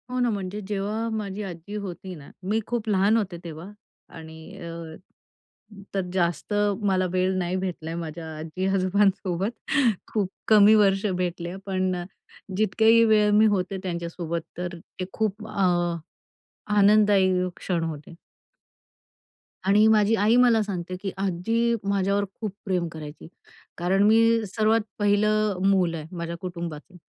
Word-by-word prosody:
हो 250 0 -2
ना 245 -1 +2
म्हणजे 200 -1 -4
जेव्हा 210 +3 -2
माझी 210 -2 -4
आजी 180 +1 -8
होती 190 -2 -6
ना, 145 -3 -12
मी 210 +4 0
खूप 230 -2 -2
लहान 200 +2 +3
होते 195 -5 -2
तेव्हा. 170 +3 -8 0.4
आणि 160 +3 -11
अ, 165 -1 -7 1.0
तर 195 - +1
जास्त 175 +1 -1 0.3
मला 190 -2 +2
वेळ 185 +1 +1
नाही 180 0 -1
भेटलाय 170 -3 -4
माझ्या 165 -1 -6
आजी-आजोबांसोबत. 190 +3 0 0.6
खूप 205 -4 0 0.2
कमी 215 0 +7
वर्ष 195 -1 +3
भेटले, 175 0 -3
पण 185 -1 0
अ, 175 - -4 0.5
जितक्याही 220 +2 +4
वेळ 210 -1 +4
मी 215 - +6
होते 185 +1 -2
त्यांच्यासोबत 170 -1 -3 0.2
तर 175 0 -4 0.2
ते 185 - -2
खूप 215 0 -2
अ, 215 - -10 1.3
आनंददायी 200 -3 +4
क्षण 170 -3 -2
होते. 160 0 -6 1.5
आणि 210 +2 +5
माझी 215 0 +4
आई 220 +2 +3
मला 245 -3 +5
सांगते, 185 -3 -4
की 195 - -3
आजी 225 +5 0
माझ्यावर 200 +1 +1
खूप 215 -4 -4
प्रेम 180 -3 0
करायची 155 -1 -9 0.5
कारण 185 +3 +2
मी 225 +1 +4
सर्वात 220 +3 +2 0.2
पहिलं 210 -1 +2
मूल 180 -4 +2
आहे 160 +3 -8
माझ्या 170 0 -4
कुटुंबाचं 170 -2 -7
190 Hz, 135 wpm, -25 LUFS, 175-210 Hz, 1.5 s, कमी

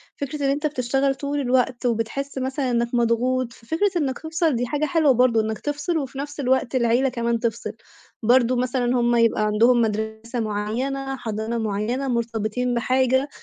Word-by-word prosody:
فكرة 285 +1 -4
إن - - +2
أنت 290 +3 -1
بتشتغل 270 0 0
طول 285 +1 -3
الوقت، 255 -1 +1
وبتحس 245 +4 -2
مثلًا 265 0 -1
إنّك 235 0 +1
مضغوط، 240 +1 +1
ففكرة 325 - -1
إنّك 275 -5 -1
تفصِل 320 -2 0
دي 245 +1 0
حاجة 295 +4 0
حلوة 305 -1 +3
برضه، 245 -2 +4
إنّك 220 0 -3
تفصِل، 290 +3 -2
وفي 270 -3 -4
نَفْس 290 +1 -6
الوقت 260 -1 +1
العيلة 245 +2 +3
كمان 235 -1 -1
تفصل، 235 0 -2 0.5
برضه 245 +2 +4
مثلًا 250 0 0
هُم 240 0 +2
يبقى 230 -2 +3
عندهم 235 +3 +4
مدرسة 220 +2 -2
معيّنة، 245 +6 -2
حضانة 220 -1 -3
معيّنة، 220 +5 -2
مرتبطين 235 0 -1
بحاجة، 260 +3 +2
250 Hz, 160 wpm, -23 LUFS, 230-275 Hz, 0.5 s, برضه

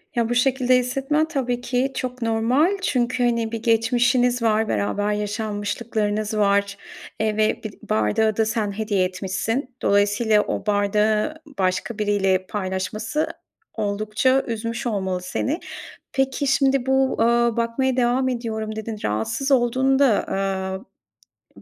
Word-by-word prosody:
Ya, 235 -1 +1
bu 240 - 0
şekilde 255 0 +3
hissetmen 270 +5 0
tabii 250 -6 -2
ki 250 +2 0
çok 255 0 -4
normal. 240 - +2
Çünkü, 250 -7 0
hani, 235 -2 +1
bir 230 -1 -5
geçmişiniz 245 +2 +2
var, 220 -1 +2
beraber 205 0 0
yaşanmışlıklarınız 210 0 -2
var, 200 -1 +2 0.4
eee, 215 -1 0
ve 215 0 +1
bi 215 - -5 0.2
bardağı 110 - +1
da 220 - +3
sen 220 -2 -1
hediye 205 -2 0
etmişsin. 205 +8 -3
Dolayısıyla, 205 +2 +3
o 205 - -4
bardağı 210 +5 +1 0.2
başka 185 +4 -1
biriyle 195 -3 +1
paylaşması 210 +7 -2 0.5
oldukça 215 +5 +1
üzmüş 230 +2 -3
olmalı 190 -5 -2
seni. 280 - -2 0.5
Peki, 270 +1 0
şimdi 270 -1 +2
bu, 265 0 +2
eee, 225 - +4 0.3
bakmaya 245 +3 0
devam 250 +2 +2
ediyorum 220 -3 -3
dedin, 220 0 -5
rahatsız 110 - -1
olduğunu 260 +1 +3
da, 260 -7 +3 1.3
eee, - - -15
225 Hz, 130 wpm, -22 LUFS, 210-250 Hz, 1.3 s, eee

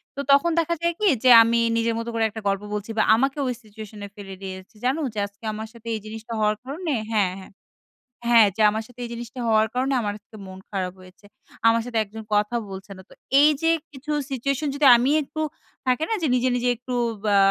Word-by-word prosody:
তো - - -7
তখন 280 +5 +5
দেখা 335 +1 0
যায় 340 0 +1
কি 425 - +2 0.2
যে 255 - +5
আমি 230 +1 +2 0.2
নিজের 230 0 0
মতো 230 +1 -4
করে 225 -1 0
একটা 220 +1 -8
গল্প 195 0 0
বলছি 210 +1 -4
বা 220 - +4
আমাকে 270 +5 0
ওই 250 - 0
সিচুয়েশনে 210 -1 -10
ফেলে 195 -2 -9
দিয়েছি। 190 +2 -8
"জানো 265 +5 +1
যে 215 - -4
আজকে 200 +2 -15
আমার 220 +1 -6
সাথে 230 -1 -14
এই - - -4
জিনিসটা 220 +1 -7
হওয়ার 215 0 +2
কারণে" 305 +5 -3 0.2
হ্যাঁ, 200 -4 +2
হ্যাঁ। 190 - -13 0.8
হ্যাঁ 230 -3 +7
যে, 220 - -1
"আমার 220 +1 -3
সাথে 245 0 -19
এই - - -8
জিনিসটা 235 +1 -8
হওয়ার 220 -1 +4
কারণে 260 +2 0
আমার 205 -2 -2
আজকে 215 +1 -16
মন 190 0 -10
খারাপ 185 -3 -2
হয়েছে। 185 +2 -17 0.4
আমার 230 0 +4
সাথে 245 -2 -3
একজন 215 +2 -10
কথা 210 +3 +1
বলছে 195 +1 -9
না।" - - -11
তো - - -16 0.3
এইযে 300 +2 +3 0.2
কিছু 290 +2 -7 0.2
সিচুয়েশন 275 +3 -1
যদি 285 0 +1
আমি 250 +4 +1
একটু 305 +2 -5 0.5
থাকে 255 +4 +2
না? - - 0
যে 320 - +1
নিজে, 250 +1 +1
নিজে 245 0 +1
একটু 250 +2 -7 0.3
বা 205 -1 +3
230 Hz, 215 wpm, -24 LUFS, 210-260 Hz, 0.8 s, হ্যাঁ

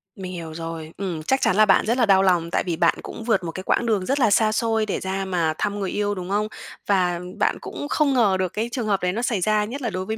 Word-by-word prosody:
Mình 185 -2 -7
hiểu 165 -3 -7
rồi. 165 -1 -6
Ừm, 175 -5 -4
chắc 265 +9 +1
chắn 185 - +2
là 215 - +6
bạn 200 - +4
rất 235 +3 +1
là 240 - +4
đau 195 -1 +5
lòng 175 -3 +2
tại - - +1
vì 175 -2 -2
bạn 170 +1 +3
cũng 225 - -8
vượt 225 -5 +1
một 165 - -4
cái 185 - -7
quãng 235 - +1
đường 210 -5 +1
rất 275 +2 0
là 225 -5 +3
xa 215 +1 +4
xôi 225 0 +1
để 205 - -2
ra 190 +1 -3
mà 170 -4 0
thăm 205 0 -2
người 195 -2 -2
yêu, 205 0 -1
đúng 180 -1 -6
không? 210 +2 0 0.4
Và 180 -3 +2 0.2
bạn - - +2
cũng 290 - -6
không 295 -3 +2
ngờ 215 -7 +3
được 185 -1 0
cái 225 +3 -2
trường 240 -3 -3
hợp 200 -2 +1
đấy 180 0 0
nó 225 - -2
xảy 235 -6 0
ra, 210 +2 +2
nhất 260 +7 -6
là 240 - -1
đối 185 -1 -4
với 220 +3 -3
200 Hz, 295 wpm, -23 LUFS, 180-220 Hz, 0.4 s, là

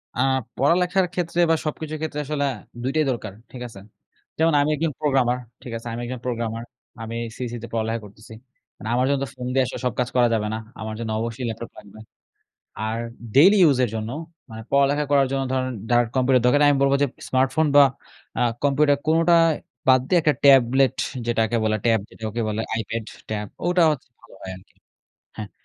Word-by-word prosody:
আ - - -5 0.4
পড়ালেখার 180 +6 +2
ক্ষেত্রে 175 -1 -2
বা 165 - +5
সবকিছুর 155 0 -4
ক্ষেত্রে 155 -2 -3
আসলে 145 0 -1 0.4
২ 130 - 0
টাই 155 -1 +3
দরকার, 110 -5 -5 0.2
ঠিক 125 - -9
আছে? 110 -4 -12 0.6
যেমন 165 0 +3
আমি 145 - +1
একজন 160 +1 -1
প্রোগ্রামার, 130 -4 +2 0.3
ঠিক 125 - -8
আছে? 115 +1 -9
আমি 120 - -4
একজন 125 +1 -5
প্রোগ্রামার, 115 -2 -3 0.4
আমি 115 +1 -6 0.2
সিইসি 120 -2 -4
তে - - -6
পড়ালেখা 115 0 -1
করতেছি। 105 +2 -14 0.4
মানে 110 - -7
আমার 125 +1 +2
জন্য 140 -1 +1
তো - - -3
ফোন 125 - -7
দিয়ে 135 0 +3
আসলে 125 - -6
সব 125 - 0
কাজ 125 - 0
করা 125 -1 +5
যাবে 105 -2 0
না, - - -2 0.2
আমার 110 0 -4
জন্য 115 - -4
অবশ্যই 115 +2 -4
ল্যাপটপ 115 +1 -7
লাগবে। 105 +2 -13 0.9
আর 110 +1 -2 0.4
ডেইলি 190 +9 +7
ইউজ 145 -6 +5
এর - - -5
জন্য 110 0 -4 0.4
মানে 110 0 -8
পড়ালেখা 140 +1 +3
করার 140 -1 +4
জন্য 135 0 0
ধরেন 130 -1 0 0.2
ডার 120 0 +4
কম্পিউটার 130 -1 +3
দরকার 125 +4 +4
নেই 145 - +6
আমি 140 - +1
বলব 135 0 +3
যে - - +2 0.2
স্মার্টফোন 135 +4 +2
বা 145 - +9 0.6
আ - - +1 0.2
কম্পিউটার 145 0 +3
কোনটা 165 +2 +4 0.5
বাদ 130 0 +7
দিয়ে 180 - +4
একটা 150 -1 +3
ট্যাবলেট 135 0 +5 0.3
যেটাকে 115 0 +1
বলে, 110 0 +1
ট্যাব 115 -2 +4
যেটাকে 110 +1 -5
বলে। 110 +1 -2
আইপ্যাড, 110 0 -3 0.2
ট্যাব 105 -1 -3 0.2
ওটা 180 0 +3
হচ্ছে 140 -3 -6
ভালো - - -18
হয় 95 - -7
আরকি 95 - -21 0.6
হ্যাঁ, 105 -2 -6
130 Hz, 190 wpm, -23 LUFS, 115-145 Hz, 0.9 s, বা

